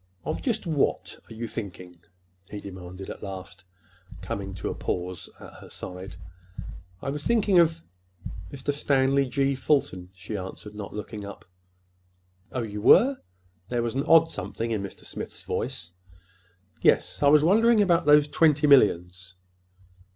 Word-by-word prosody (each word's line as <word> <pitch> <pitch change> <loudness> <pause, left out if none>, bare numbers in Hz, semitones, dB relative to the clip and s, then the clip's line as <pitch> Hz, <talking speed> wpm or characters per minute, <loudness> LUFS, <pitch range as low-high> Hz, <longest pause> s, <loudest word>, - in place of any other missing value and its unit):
"Of - - -3
just 225 -5 -1
what—are 150 -7 -2
you 115 +1 -4
thinking?" 90 -6 -7 0.5
he 105 - -6
demanded 95 -1 -9
at - - -10
last, 95 -1 -8 0.6
coming 95 +1 -5
to 90 - -4
a - - -3
pause 90 0 -4
at - - -12
her - - -13
side. 90 0 -8 0.9
"I 135 - -2
was 145 +1 -5
thinking—of 175 -5 +3 0.7
Mr. 140 +1 -3
Stanley 135 -1 +2
G. 140 0 +1
Fulton," 130 -10 0
she 95 +3 -7
answered, 100 +2 -7
not 105 -2 -8
looking 105 0 -6
up. 100 0 -9 1.1
"Oh, 125 - -2
you 105 -1 -5
were!" 260 - +6 0.5
There 120 +1 -1
was 115 - -2
an 135 +2 -1
odd 165 0 +6
something 105 +4 -4
in 110 -3 -1
Mr. 100 - -9
Smith's - - -7
voice. 85 -1 -4 0.9
"Yes. - - +2
I 145 - +5
was 150 +1 +6
wondering—about 200 -3 +4
those 150 0 +6
twenty 150 0 +3
millions." 90 - +3
115 Hz, 140 wpm, -26 LUFS, 95-150 Hz, 1.1 s, were